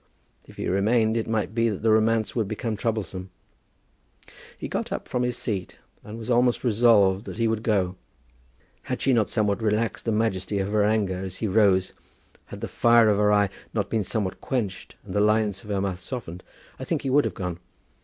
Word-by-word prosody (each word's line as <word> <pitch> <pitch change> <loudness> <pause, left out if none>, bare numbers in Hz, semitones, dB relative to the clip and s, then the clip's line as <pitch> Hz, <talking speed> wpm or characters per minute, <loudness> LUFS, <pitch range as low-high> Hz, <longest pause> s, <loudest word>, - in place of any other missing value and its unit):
If - - -15
he - - -3
remained 110 +4 +2
it 115 - -1
might 110 -2 -1
be 115 0 +2
that 105 -1 -5
the 110 - +4
romance 110 -1 +2
would 110 -4 0
become 110 +2 -3
troublesome. 100 -4 -3 1.3
He - - -5
got - - -3
up - - -4
from 125 - -1
his 125 -1 -1
seat, 95 -5 -4 0.3
and 105 +1 -8
had 115 +1 -7
almost 120 0 +2
resolved 110 -4 +4
that - - -7
he 115 -1 +1
would 110 -1 -1
go. 95 -5 0 0.9
Had - - -3
she 135 - +2
not 110 -4 +2
somewhat 105 -2 0
relaxed 110 +1 0
the 115 - +1
majesty 105 -2 0
of 100 +1 -1
her 105 -1 +3
anger 105 -3 +1
as 95 -1 -5
he 110 - -2
rose, 95 -2 +3 0.5
had - - -10
the - - -3
fire 115 -1 +4
of 105 -1 +2
her 105 0 +4
eye 100 -1 +3 0.3
not 105 -2 -1
been 110 -2 +1
somewhat 100 -1 -3
quenched 105 -8 -3
and - - -8
the 105 - +2
lines 105 -2 +1
of 105 - -12
her 100 -1 0
mouth 95 -2 -2
softened, 90 -5 -7 0.4
I - - -5
think - - -1
that - - -18
he 135 - -1
would 145 +2 +4
have - - -3
gone. 90 -2 -4
105 Hz, 210 wpm, -25 LUFS, 100-115 Hz, 1.3 s, the